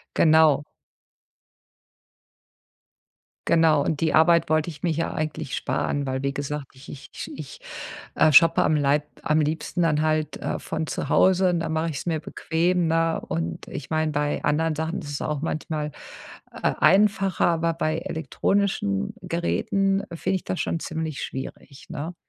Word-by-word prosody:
Genau. 155 -3 +5 2.8
Genau. 160 -3 +4
Und 155 -1 -2
die 160 - +1
Arbeit 170 0 +4
wollte 155 +1 +2
ich 150 -2 -11
mir 170 - +1
hier 165 +1 -2
eigentlich 155 -4 -3
sparen, 145 -1 -1
weil, 130 0 -2
wie 140 0 -1
gesagt, 140 0 -4
ich 130 +2 -14
ich 140 - -9
ich, 150 -3 -9 0.6
äh, 155 - +4
shoppe 165 +4 +7
am 155 - +3
Leib 145 +1 +2 0.2
am 155 +1 +2
liebsten 160 +3 -1
dann 150 -3 +2
halt, 155 -1 0
äh, - - -3
von 160 0 -4
zu - - -4
Hause, 185 0 +4
und 175 -1 0
dann 165 -1 -3
mache 160 +1 0
ich 140 - -4
es - - -8
mir 160 -3 0
bequem, 170 +3 0
ne? 165 0 +1
Und 80 0 -3
ich - - -7
meine, 155 -1 0
bei 145 0 -1
anderen 155 +2 +1
Sachen 160 +2 -3
ist 145 - -8
es 145 - -4
auch 150 -2 -2
manchmal, 155 -1 -3 0.7
äh, - - +2
einfacher, 195 -1 +3
aber 165 0 +1
bei 155 -1 -1
elektronischen 160 - -1
Geräten 195 +3 0
finde 190 +3 -1
ich - - -6
das 185 - -3
schon 165 - -1
ziemlich 160 -2 -4
schwierig, 135 +1 -7
ne? 165 +2 -5
160 Hz, 160 wpm, -24 LUFS, 150-165 Hz, 2.8 s, shoppe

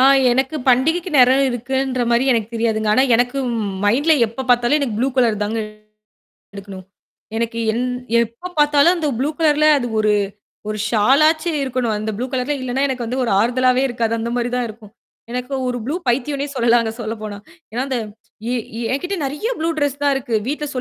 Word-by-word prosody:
ஆ. - - +5 0.3
எனக்குப் 265 +3 -1
பண்டிகைக்கு 320 +8 +2
நேரம் 260 +1 +5
இருக்குன்றமாரி 250 0 0
எனக்கு 225 -3 -1
தெரியாதுங்க. 220 -2 0
ஆனா, 260 - +4
எனக்கு 245 +3 +1 0.5
மைண்ட்ல 280 +10 +3
எப்ப 245 +4 -6
பார்த்தாலும் 245 0 +2
புளு 255 +4 +1
கலர் 225 -5 +2
தாங்க 220 +2 -2 1.0
எடுக்கணும். 195 -1 -9 0.5
எனக்கு 230 0 -2
எந் 240 +3 -1 0.4
எப்ப 235 +11 -9
பார்த்தாலும் 295 +4 +4
அந்த 315 - -1
புளு 280 - +1
கலர்ல 305 -2 +3
அது 245 - -2
ஒரு 215 0 +2 0.6
ஒரு 215 - -3
ஷாலா 260 +8 +4
ஆச்சு 330 +2 -4
இருக்கணும். 250 -3 -1
அந்த 215 +1 -4
புலு 245 - -2
கலர்ல 265 +2 -1
இல்லன்னா 255 +1 -2
எனக்கு 255 -3 -3
வந்து 255 +3 -3
ஒரு 240 - -1
ஆறுதலாவே 250 +4 +2
இருக்காது. 235 -2 -1
அந்தமாரி 235 +1 -2
தான் 250 - 0
இருக்கும். 215 -2 -12 0.4
எனக்கு 250 +2 -4
ஒரு 245 0 -2
புளு 290 - -2
பைத்தியோனே 275 +4 0
சொல்லலாங்க 235 -1 +3
சொல்லப்போனா 215 -2 -5 0.3
ஏன்னா 245 +4 -2
அந்த 260 -2 -1 0.5
ஏ - - 0 0.4
என்கிட்ட 355 +8 -2
நிறைய 295 - -3
புளு 325 +1 0
ட்ரஸ் 285 -1 -1
தான் 285 -1 +3
இருக்கு. 245 -4 -2
வீட்ல 295 +1 -2
250 Hz, 165 wpm, -19 LUFS, 230-275 Hz, 1.0 s, ஆ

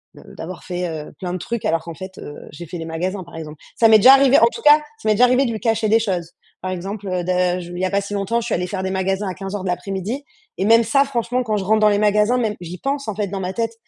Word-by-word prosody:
de - - -14
d'avoir 170 +2 -8
fait, 180 -1 -3
heu, 155 -2 -6
plein 180 -2 -4
de - - -2
trucs 230 +5 -4
alors 165 0 0
qu'en 170 - -7
fait, 190 +2 -10
heu, 145 - -8 0.2
j'ai 170 +4 -9
fait 175 - -7
les 165 - -6
magasins 180 +4 -3
par 170 -1 -14
exemple. 155 -2 -8 0.2
Ça 225 - +5
m'est 220 - +8
déjà 260 +6 +9
arrivé, 275 0 +6
en 230 - +6
tout - - -7
cas, 295 0 +8
ça 295 -6 -11
m'est - - +5
déjà 250 - +6
arrivé 255 +2 +3
de 235 - -1
lui 220 - -4
cacher 225 -2 0
des 225 +2 +5
choses. 180 -6 -2 0.3
Par 185 0 -3
exemple, 195 +3 -5
heu, 180 -1 -1
de 180 0 +1
je 175 0 -8
il 175 - -6
y 185 - 0
a - - -2
pas 200 0 +1
si 200 +1 -7
longtemps, 200 +3 0
je 230 - -6
suis 235 - -1
allée 180 +1 -2
faire 190 0 -4
des 190 - -2
magasins 190 +1 -1
à 185 - -3
15:00 195 0 -5
de 190 - -3
l'après-midi 195 - -3 0.3
et 190 - -1
même 230 +2 +6
ça, 275 +5 +3
franchement, 250 -1 -1
quand 215 -3 -1
je 190 - -3
rentre 215 +2 +3
dans 215 - +6
les 205 0 +2
magasins, 210 +3 +3
même, 220 -4 -1
j'y 175 +1 -7
pense 275 -2 -3
en - - -2
fait 210 -1 -2
dans 195 +1 -5
ma 185 0 -3
tête. 230 +1 -2
200 Hz, 310 wpm, -20 LUFS, 180-230 Hz, 0.3 s, déjà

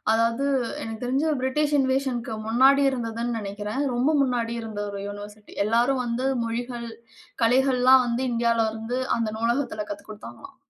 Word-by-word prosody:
அதாவது 230 +4 +1 0.4
எனக்கு 225 +1 -6
தெரிஞ்சு 265 +5 0
பிரிட்டிஷ் 290 +3 0
இன்வேஷன்க்கு 260 -3 0
முன்னாடி 265 +5 +5
இருந்ததுன்னு 235 -1 -3
நினைக்கிறேன். 205 +5 -4
ரொம்ப 245 +5 +2
முன்னாடி 245 -3 0
இருந்த 220 -2 -6
ஒரு 200 -1 -5
யுனிவர்சிட்டி 205 +1 -10
எல்லாரும் 240 +4 +2
வந்து 240 +2 -2 0.2
மொழிகள் 235 +1 -4 0.5
கலைகள்லாம் 255 +1 +5
வந்து 235 +2 -1
இந்தியாவில 230 -1 +2
இருந்து 225 +3 -4 0.2
அந்த 230 -2 -1
நூலகத்தில 230 -1 -1
கத்துக்கொடுத்தாங்களாம். 200 - -9
235 Hz, 130 wpm, -25 LUFS, 225-260 Hz, 0.5 s, முன்னாடி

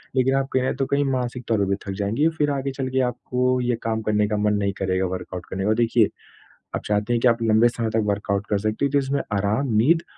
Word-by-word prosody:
लेकिन 130 +1 +3
आप 135 0 +1
कहीं 130 - +2
न 130 - 0
तो 135 - -1
कहीं 140 +1 +1
मानसिक 125 -2 -2
तौर 110 -2 +2
पर 100 - +2
भी 100 - +2
थक - - -2
जाएँगी, 115 +11 +1
फिर 145 -1 +2
आगे 135 -1 -2
चल 135 -1 -4
के 130 0 0
आपको 125 +1 -1
ये 120 -1 +1
काम 110 -1 -1
करने 105 -1 +1
का 105 0 -1
मन 105 0 +2
नहीं 100 -1 0
करेगा 95 0 0
वर्कआउट 90 -1 -6
करने 95 0 -3
का। - - +1
और 110 - +3
देखिए, 115 -1 +3 0.7
आप - - -3
चाहते 105 +3 0
हैं 120 - +2
कि 125 - +4
आप 115 -1 +2
लंबे 110 +1 +5
समय 115 -1 -2
तक 110 - +2
वर्कआउट 100 0 -1
कर 105 -1 +1
सकते 110 +6 -1
हो 140 - -1
जिसमें 140 +1 -1
आराम, 110 +5 0
नींद 160 +10 +4
115 Hz, 260 wpm, -23 LUFS, 105-130 Hz, 0.7 s, लंबे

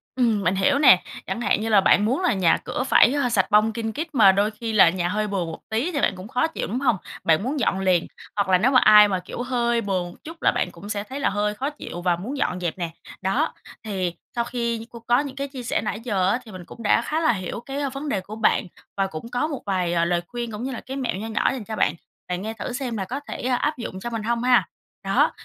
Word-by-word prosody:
Ừm, 225 -6 +2
mình 185 +2 +2
hiểu 195 +9 +2
nè. 185 -11 +7 0.2
Chẳng 190 +5 -3
hạn 215 - +1
như 225 - -2
là 205 -3 +6
bạn 205 +2 +4
muốn 260 +11 0
là 360 - +2
nhà 185 -4 +3
cửa 255 - -4
phải, 265 -1 +5
ơ, 280 -4 +1
sạch 205 -2 +1
bong 215 +1 +4
kin 225 -1 -3
kít 315 +8 -4
mà 200 -5 +7
đôi 205 +3 +1
khi 225 +1 -5
là 190 -5 +7
nhà 175 0 -1
hơi 215 +2 -1
bừa 195 -4 -1
một 165 - -7
tí 230 +10 0
thì 285 -4 -1
bạn 195 - +2
cũng 185 +3 -9
khó 250 +7 +1
chịu, 320 - -4
đúng 240 +5 -2
hông? 255 -6 +2 0.3
Bạn 160 +5 +3
muốn 275 +3 -2
dọn 190 -5 +1
liền, 185 -3 +2 0.3
hoặc 200 -2 0
là 185 - +6
nếu 245 +8 +2
mà 255 - +6
ai 210 -1 +8
mà, 190 -2 -1
kiểu, 180 +6 -7
hơi 240 -2 0
bừa 195 -3 -1 0.2
chút 325 +2 -10
là - - +4
bạn - - 0
cũng 205 - -11
sẽ 205 -1 -2
thấy 265 +6 -7
là - - +2
hơi 210 +1 0
khó 270 +7 -2
chịu 225 - -8
và 175 -1 +2
muốn 240 +11 -5
dọn 185 -9 -1
dẹp 175 0 -3
nè. 170 -2 -3 0.3
Đó, 240 - 0 0.3
thì 185 -5 -2 0.2
sau 235 - +1
khi 235 -1 -2
như 225 - -8
cô 235 - -10
có 240 +2 +4
những 280 -2 -4
cái 275 0 -3
chia 265 -3 -8
sẻ - - -1
nãy 215 0 -3
giờ 195 -6 +1
á 240 +5 +1
thì 220 - -11
mình 185 -2 -9
cũng 230 - -11
đã 210 - +4
khá 305 +6 -1
là 275 - +4
hiểu 190 +2 -4
cái, 275 +1 -5
ơ, 280 -2 -1
vấn 280 +2 -5
đề 195 -6 0
của 210 +3 -9
bạn 220 -2 +2 0.3
và 195 -1 +1
cũng 160 +6 -8
có 245 +5 0
một 290 -4 -5
vài, 180 -3 0
ờ, 170 0 +2
lời 175 0 +1
khuyên 240 -2 -5
cũng 210 +3 -6
như 265 - -3
là 245 - -6
cái 265 +2 -6
mẹo 255 -7 -2
nho 215 +4 -5
nhỏ 220 - +1
dành 255 -5 -5
cho 220 +1 -5
bạn, 150 - +2 0.3
bạn 180 0 -3
nghe 220 +2 -4
thử 225 +2 -5
xem 245 -3 -3
là 195 - -2
có 260 +8 -4
thể 290 - -8
áp 260 +4 0
dụng 190 -5 -6
cho 240 - -5
mình 225 -2 -4
hông 235 +2 -1
ha? 250 -1 +4 0.4
Đó, - - +3
220 Hz, 290 wpm, -23 LUFS, 190-250 Hz, 0.4 s, ai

